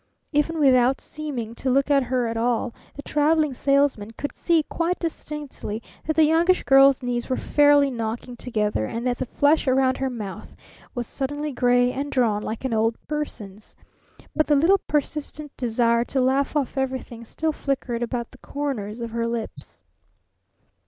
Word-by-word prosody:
Even 305 +2 +1
without 260 -2 +4
seeming 270 -8 -6
to 260 +3 -3
look 275 +3 +2
at 280 -1 +5
her 250 -1 0
at 230 0 -2
all, 235 +1 0 0.2
the 285 - -8
Traveling 300 0 +2
Salesman 275 -5 +1
could 285 +5 -5
see 335 -3 +2
quite 340 +3 -1
distinctly 300 -9 -5 0.3
that 315 - 0
the 320 - +5
Youngish 335 +4 +3
Girl's 270 -1 +5
knees 240 -1 -2
were 255 - 0
fairly 290 -1 +4
knocking 235 +1 -4
together 210 - -1
and 235 +2 -4
that 250 -1 0
the 260 - -2
flesh 290 +3 +2
around 260 0 +2
her 265 0 0
mouth 210 -6 -7 0.4
was 245 -1 -2
suddenly 290 +4 -3
gray 245 -1 +3
and 280 +3 -4
drawn, 225 -5 +1
like 220 +4 -5
an 255 - -1
old 225 +1 +2
person's. 215 -9 -6 0.6
But 310 - +2
the 295 - +4
little 345 +8 +4
persistent 295 -1 -3
desire 235 -1 +1
to 270 - -1
laugh 265 +3 +1
off 280 -2 -1
everything 260 -3 -4
still 315 +7 -2
flickered 260 -5 -3
about 240 0 -3
the 260 - -17
corners 245 -8 -4
of 230 -1 -4
her 230 0 -1
lips. 230 -1 -6
260 Hz, 165 wpm, -24 LUFS, 235-290 Hz, 0.6 s, at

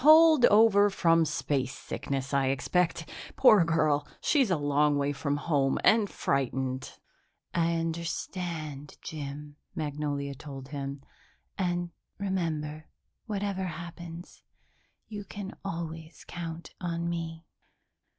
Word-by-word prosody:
Holdover 240 -10 +7
from 165 -3 +4
spacesickness, 135 -1 -2
I 135 -1 +3
expect. 165 +5 +1 0.3
Poor 215 -8 +7
girl, 155 -3 +2
she's 270 -7 +3
a 180 - +2
long 145 0 +2
way 140 0 +1
from 145 0 -1
home 145 -3 +1
and 215 -2 +5
frightened." 130 -1 -1 0.6
"I 170 0 +2
understand, 165 -2 -4
Jim," 145 -1 -6 0.2
Magnolia 145 -2 -2
told 135 -1 -9
him, 140 -1 -5 0.5
"and, 175 -2 -1 0.3
remember, 155 -6 -2 0.4
whatever 200 -3 -2
happens, 170 0 -8 0.7
you 205 -2 -6
can 200 0 -7
always 165 -3 -6
count 170 -1 -6
on 170 -1 -2
me." 165 -1 -4
165 Hz, 100 wpm, -29 LUFS, 145-180 Hz, 0.7 s, Holdover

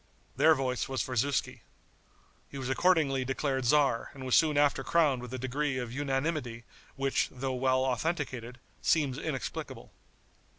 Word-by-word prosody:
Their 155 +4 +5
voice 130 -2 -2
was 130 -4 -1
for 125 - -5
Zuski. 140 +4 0 0.9
He 140 - -8
was 130 -1 -4
accordingly 140 -3 +2
declared 135 0 -1
tzar 135 -3 +2
and 130 -1 -8
was 130 - -1
soon 155 -3 +4
after 145 -1 +3
crowned 150 -7 +2
with 125 -1 -8
a 130 - -4
degree 130 +2 -2
of 120 -2 -4
unanimity 135 -3 -2 0.3
which, 135 0 0
though 130 +1 -4
well 130 0 +1
authenticated, 130 -3 -2 0.2
seems 145 -4 +1
inexplicable. 150 -6 -5
135 Hz, 145 wpm, -30 LUFS, 130-145 Hz, 0.9 s, Their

